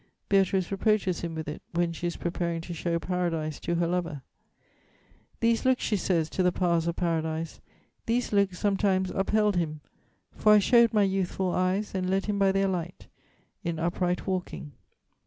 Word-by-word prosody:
Beatrice 190 -2 +2
reproaches 195 -3 +1
him 170 -1 -4
with 160 -1 -5
it, 150 - -6
when 170 0 0
she 175 +1 -3
is 170 - -3
preparing 170 -1 -2
to 170 +1 -7
show 170 +1 -1
Paradise 165 -4 -2
to 170 - -2
her 170 0 +1
lover: 170 -5 -2 1.2
"'These 230 0 +2
looks,' 260 -1 +2
she 210 - +1
says 170 -4 +1
to - - -1
the 180 0 +3
powers 170 -2 +1
of 170 - -1
Paradise, 160 -1 -2 0.5
These 235 0 0
looks 200 -3 +2
sometimes 195 -2 +1
upheld 210 0 +1
him; 155 -3 -2 0.5
for 215 - +4
I - - +8
show'd 235 +3 +5
My 210 -2 +3
youthful 190 -1 0
eyes, 185 +4 0
and 185 -1 -1
led 195 +1 +1
him 205 -1 -1
by 195 -1 +4
their 195 0 +2
light 180 -2 -4 0.5
In 170 -2 -2
upright 175 +2 -1
walking. 180 -5 -4
180 Hz, 175 wpm, -27 LUFS, 170-195 Hz, 1.2 s, I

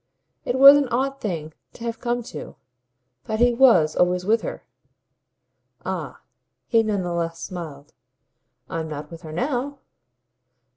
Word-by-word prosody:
It 245 - -1
was 275 +2 +10
an 285 -2 +1
odd 270 +3 -1
thing 160 -8 -4 0.2
to 235 - -11
have 230 -1 -4
come 240 0 -2
to, 155 -9 -9 0.7
but 220 0 -3
he 245 0 +4
WAS 230 -12 +5
always 180 0 +1
with 225 +3 +2
her. - - -7 1.2
"Ah," - - -5 0.4
he 230 -2 +3
none 210 -4 -1
the 175 -1 -3
less 165 -1 -2
smiled, 160 -6 -8 0.7
"I'm 165 -1 -4
not 150 +2 -7
with 165 0 -10
her 160 -3 -9
now." 260 - -2
215 Hz, 145 wpm, -23 LUFS, 165-245 Hz, 1.2 s, was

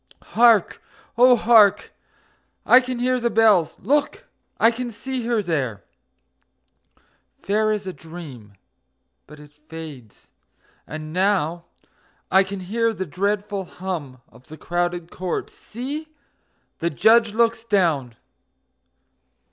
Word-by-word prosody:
Hark! 230 -4 +4 0.3
Oh, 250 +2 +6
hark! 220 -3 +4 0.7
I 250 - +7
can 255 -1 -5
hear 255 +1 0
the 235 0 0
bells!... 215 -8 +3
Look! 290 +2 -1 0.3
I 225 - +5
can 245 +1 -5
see 245 +1 -5
her 230 -3 0
there, 130 - -3 1.6
Fair 215 +2 0
as 210 -2 -3
a 185 - -5
dream... 150 -12 -11 0.7
but 150 +1 -14
it 150 0 -16
fades... 150 -6 -12 0.6
And 155 0 -8
now 180 -3 0 0.7
I 190 +1 +5
can 195 0 -7
hear 225 +4 -1
the 190 - -4
dreadful 200 +3 -2
hum 165 -10 -6
Of 125 +2 -20
the 155 - -11
crowded 175 +1 -3
court... 185 -1 -4
See! 280 +7 -7 0.7
the 170 - 0
Judge 220 +6 +3
looks 230 -1 +1
down... 165 - 0
195 Hz, 115 wpm, -22 LUFS, 160-230 Hz, 1.6 s, I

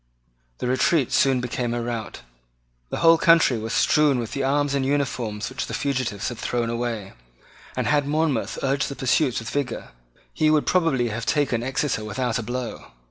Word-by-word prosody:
The - - -4
retreat 130 +2 +2
soon 135 -2 +3
became 120 -1 -2
a 120 - -2
rout. 115 - -5 0.7
The - - -4
whole 165 0 +7
country 165 -8 +5
was 110 +1 -5
strewn 150 -3 +3
with 115 -3 -4
the 140 - -2
arms 145 +1 +1
and 140 -1 +1
uniforms 125 -6 -1
which 130 - -4
the - - -4
fugitives 125 -8 -2
had 120 - -8
thrown 120 -1 -1
away; 115 -4 -3 0.6
and, - - -1
had 145 -1 +2
Monmouth 150 -4 0
urged 140 +1 0
the 140 - -6
pursuit 130 0 +1
with 115 - -4
vigour, 140 -5 -3 0.4
he 155 - +2
would 155 -1 +3
probably 155 -10 +2
have 115 +2 -5
taken 140 -6 +1
Exeter 130 -2 -1
without 115 +4 -2
a - - -4
blow. 120 +1 -5
130 Hz, 180 wpm, -24 LUFS, 115-145 Hz, 0.7 s, whole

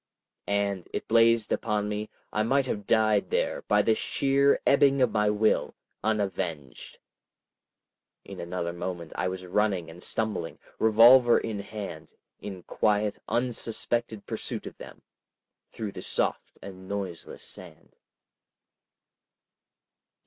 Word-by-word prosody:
And, 100 -2 -1
it - - -4
blazed 115 -1 +4
upon 105 -1 0
me, 105 +1 -3 0.2
I 105 - +1
might 135 +5 +2
have 105 -5 -4
died 110 -2 +3
there - - 0
by 105 0 +4
the 110 - +3
sheer 140 +4 +2
ebbing 140 0 +4
of 125 -3 +3
my 105 -1 +2
will—unavenged! 100 - -2 1.3
In - - -9
another 85 0 -3
moment 85 -2 -5
I - - -1
was 90 0 -5
running 95 -3 0
and 85 +2 -13
stumbling, 105 -7 -3 0.2
revolver 120 +3 +7
in 110 -3 -3
hand, 105 0 -7 0.3
in 95 -3 -8
quiet 105 -1 0
unsuspected 120 -2 -2
pursuit - - -5
of - - -8
them, - - -12 0.7
through 110 -3 -5
the - - -8
soft - - -2
and 95 -1 -10
noiseless 95 -4 -5
sand. 80 -3 -11
105 Hz, 120 wpm, -27 LUFS, 95-115 Hz, 1.3 s, revolver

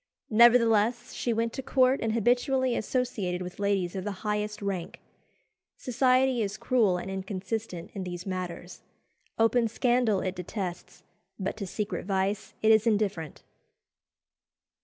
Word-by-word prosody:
Nevertheless, 235 0 +4
she 240 - -2
went 230 0 0
to 265 - -4
court 260 0 +3
and 225 -1 0
habitually 245 +2 +2
associated 210 -7 -2
with 180 +2 -9
ladies 200 -3 0
of 190 - -3
the 200 0 -6
highest 210 0 -1
rank. 195 -4 -4 0.8
Society 255 0 +2
is 205 0 -2
cruel 220 -8 +2
and 185 +2 -5
inconsistent 190 -1 -5
in 195 - -4
these 175 -1 -6
matters. 180 -2 -5 0.6
Open 230 +1 +3
scandal 235 -3 +1
it 185 - -2
detests, 180 0 -6 0.3
but 195 -1 -3
to 200 -3 -5
secret 195 -2 -4
vice 195 +1 -1
it 220 - +6
is 220 +1 +4
indifferent. 200 -8 -1
210 Hz, 135 wpm, -28 LUFS, 190-235 Hz, 0.8 s, it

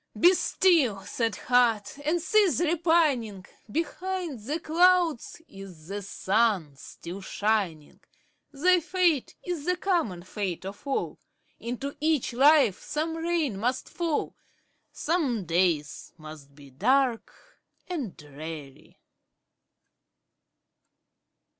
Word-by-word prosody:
Be 355 +2 +7
still, 320 - +2
sad 225 +3 -2
heart! 240 -2 +1
and 320 +4 +1
cease 395 +1 +3
repining; 310 - +1 0.3
Behind 345 - -3
the 285 +10 -3
clouds 335 -2 +2
is 185 -5 -12
the 205 +1 -4
sun 195 -5 0
still 175 +7 -9
shining; 195 -7 -2 0.5
Thy 355 +6 +3
fate 345 -5 0
is 345 -5 -4
the 360 0 +1
common 330 - -1
fate 185 -2 -4
of 200 +8 -9
all, 275 - -2 0.4
Into 250 +4 -5
each 305 -5 0
life 275 -5 +5
some 320 +2 -3
rain 325 - -1
must 250 +4 -1
fall, 335 -4 -2 0.6
Some 280 - -1
days 165 -4 0
must 155 -3 -12
be 140 -2 -15
dark 255 - -1 0.3
and 290 - -5
dreary. 150 -1 -10
250 Hz, 105 wpm, -27 LUFS, -, 0.6 s, Be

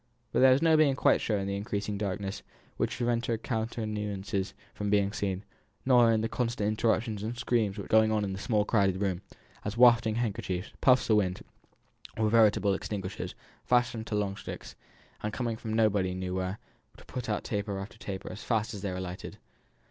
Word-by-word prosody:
But - - +1
there 130 0 +7
was 135 +5 +3
no 160 -1 +5
being 150 -3 +4
quite - - +3
sure 105 - 0
in 100 - -2
the 100 0 -2
increasing 100 0 -3
darkness, 100 -1 -3 0.3
which - - -1
prevented 120 -2 0
countenances 105 -4 -3 0.2
from 105 0 -3
being 100 -1 +3
seen; 100 -1 -2 0.4
nor 120 -3 +6
in 110 -1 +2
the 115 - 0
constant 115 -3 -1
interruptions 110 -1 0
and 115 +3 -4
screams 110 -5 0
which 100 - -4
were - - -10
going 110 0 +3
on 105 -1 +1
in 95 -1 -2
the 95 - -5
small 105 -1 +1
crowded 100 -4 +2
room, 95 -3 -1 0.4
as 105 +2 -4
wafting 120 -2 +6
handkerchiefs, 100 -5 -2
puffs 130 -1 +5
of 110 - +6
wind, 95 -3 0 0.7
or 110 -1 +1
veritable 105 -3 +4
extinguishers, 95 -1 -4 0.3
fastened 120 -2 +1
to 105 - -2
long 100 -1 -1
sticks, - - -8 0.5
and 105 0 -3
coming 120 -1 -2
from 110 0 -6
nobody 100 -5 +2
knew 90 0 -3
where, 95 +1 -2 0.5
put 125 -2 -5
out 105 - -1
taper 100 -2 -2
after 100 +3 -8
taper 95 -2 -6
as 95 - -8
fast 110 -1 0
as 100 - -6
they 100 -1 -2
were 90 - -4
lighted. 90 0 -6
105 Hz, 190 wpm, -29 LUFS, 100-115 Hz, 0.7 s, there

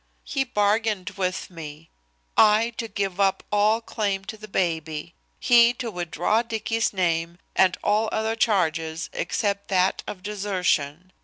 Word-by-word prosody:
"He 270 - -1
bargained 210 -4 0
with 190 -1 -3
me: 160 -1 -10 0.4
I 220 +2 +5
to 230 - -3
give 195 -2 -3
up 195 -1 +2
all 210 +2 +3
claim 200 -4 -2
to 220 - -6
the 215 0 -11
baby. 165 -4 -2 0.3
He 240 0 +5
to 240 -2 -4
withdraw 175 +4 0
Dicky's 225 -1 -1
name, 170 -3 -1 0.2
and 185 -1 +4
all 215 +1 +2
other 220 +1 -1
charges 165 -7 0
except 200 -2 -1
that 185 -1 +2
of 185 -2 -7
desertion. 185 -5 -1
200 Hz, 140 wpm, -24 LUFS, 175-220 Hz, 0.4 s, I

